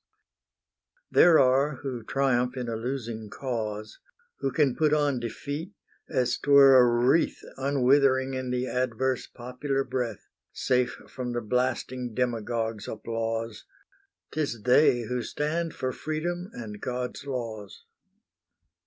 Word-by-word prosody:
There 170 -2 +7
are 135 +2 +3
who 130 -4 -4
triumph 125 +1 0
in 125 -1 -3
a 115 - -2
losing 115 -2 -4
cause, 110 -5 -4 0.4
Who 135 - -1
can 145 -4 +2
put 155 -1 +3
on 145 -4 +1
defeat, 145 - -5 0.4
as 130 -5 +1
't - - -6
were 140 -1 +8
a 120 -1 +5
wreath 160 +5 +2
Unwithering 135 0 +3
in 130 -1 -3
the 125 0 -1
adverse 130 0 -1
popular 130 +3 -3
breath, 125 -5 -4 0.3
Safe 125 -1 +1 0.2
from 125 -2 -5
the 120 - -1
blasting 125 0 -1
demagogue's 115 -3 -2
applause; 115 0 -4 0.7
'Tis 140 -8 -2
they 125 -1 +5
who 125 +2 -2
stand 155 +7 -2
for 130 -2 -2
Freedom 175 +6 -3
and 105 - -8
God's 125 +2 -4
laws. 115 -6 -6
125 Hz, 125 wpm, -27 LUFS, 120-140 Hz, 0.7 s, were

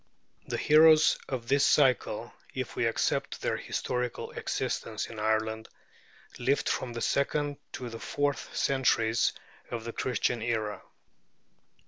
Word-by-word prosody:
The - - -2
heroes 155 +1 +6
of 125 -3 -4
this 140 +2 +3
cycle, 135 -4 +2 0.2
if - - -4
we - - +1
accept - - -1
their - - +1
historical 125 -1 -3
existence - - -3
in 110 - -9
Ireland, 110 +1 0 0.7
lived 135 +3 +1
from 120 -2 -1
the 115 - -5
second 145 +1 0 0.2
to 125 - -5
the 115 -1 -7
fourth 145 +3 -1
centuries 115 -4 +2 0.4
of 115 -2 -4
the 115 0 -6
Christian 125 -2 -1
era. 110 -3 -2
125 Hz, 125 wpm, -29 LUFS, 115-140 Hz, 0.7 s, heroes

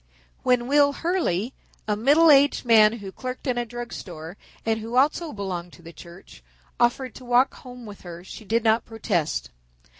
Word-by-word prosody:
When 250 -1 +2
Will 285 +1 +4
Hurley, 280 - -1 0.3
a 210 - +1
middle 295 +9 +5
aged 280 -1 +4
man 220 -2 +6
who 205 -4 -8
clerked 255 +6 -7
in 250 -3 0
a 240 - -3
drug 240 +1 -7
store 165 -1 -8 0.3
and 225 0 0
who 225 +2 -6
also 300 +4 +2
belonged 180 -5 -5
to 175 - -16
the 165 +1 -11
church, 170 - -14 0.4
offered 245 +1 +1
to - - -12
walk 245 +2 +3
home 250 -1 -12
with 205 -2 -11
her 175 -1 -10
she 190 - -10
did 225 +2 0
not 225 0 +3
protest. 180 - -2
230 Hz, 180 wpm, -24 LUFS, 195-255 Hz, 0.4 s, man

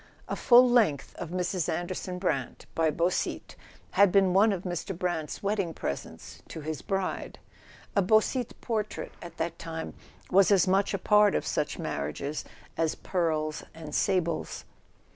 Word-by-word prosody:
A - - -2
full 250 +1 +7
length 215 - +2
of 170 - -5
Mrs. 180 0 -1
Anderson 175 +2 -3
Brant 150 -9 -2
by 160 -1 +2
Beausite 170 +4 -1 0.4
had 200 -2 +5
been 195 -2 +4
one 210 +3 +5
of 190 -2 -3
Mr. 175 0 -4
Brant's 175 -3 -3
wedding 195 -5 -1
presents 70 - -6
to 160 - -7
his 155 -2 -4
bride; 195 -1 -3 0.6
a 200 - +5
Beausite 220 +5 +2
portrait, 215 -3 -3
at 170 -1 -10
that 165 0 -3
time, 160 -1 -5 0.4
was 195 +1 +6
as 195 -2 +4
much 195 +2 +2
a - - 0
part 210 +1 +4
of - - 0
such - - -1
marriages 140 - -3 0.3
as 165 -1 +1
pearls 155 -4 -1
and 155 -2 -8
sables. 180 -3 0
180 Hz, 150 wpm, -28 LUFS, 160-200 Hz, 0.6 s, full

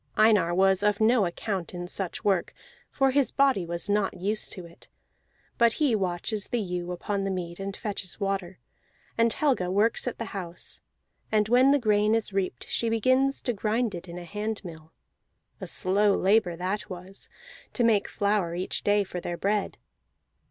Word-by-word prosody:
Einar 210 -6 +4
was 190 0 +3
of 205 0 +2
no 220 -2 +4
account 185 0 -4
in 175 0 -4
such 180 0 -3
work, 195 -4 +1 0.3
for 270 -1 +2
his 280 0 +2
body 265 -11 +2
was 170 +2 -3
not 205 -2 0
used 210 +4 -1
to 185 -3 -8
it; 170 0 -17 0.7
but 235 -1 +5
he 290 -6 +1
watches 195 +1 -1
the 240 - -1
ewe 180 -3 -3
upon 195 +3 -2
the 195 - -1
mead, 175 -2 -4
and 195 0 -5
fetches 200 -3 -4
water; 195 -2 -2 0.6
and 230 0 +3
Helga 250 -10 +1
works 210 +6 +1
at 245 - -3
the 230 - -6
house, 180 -3 -5 0.5
and 210 -1 +3
when 250 +3 +5
the 285 - +5
grain 215 -3 +2
is 225 -3 -2
reaped 190 -2 -2
she 230 - -1
begins 255 +5 +2
to 245 - 0
grind 220 +2 0
it 175 0 -7
in 170 - -7
a 175 - -7
handmill; 180 -5 -6 0.7
a - - -6
slow 200 +2 +2
labor 195 -3 +3
that 185 +4 -3
was, 185 +1 -10 0.4
to 245 - 0
make 220 -3 +3
flour 200 -4 0
each 180 +1 -3
day 205 0 +3
for 180 -2 -6
their 175 0 -4
bread. 205 +2 -1
200 Hz, 175 wpm, -27 LUFS, 180-220 Hz, 0.7 s, but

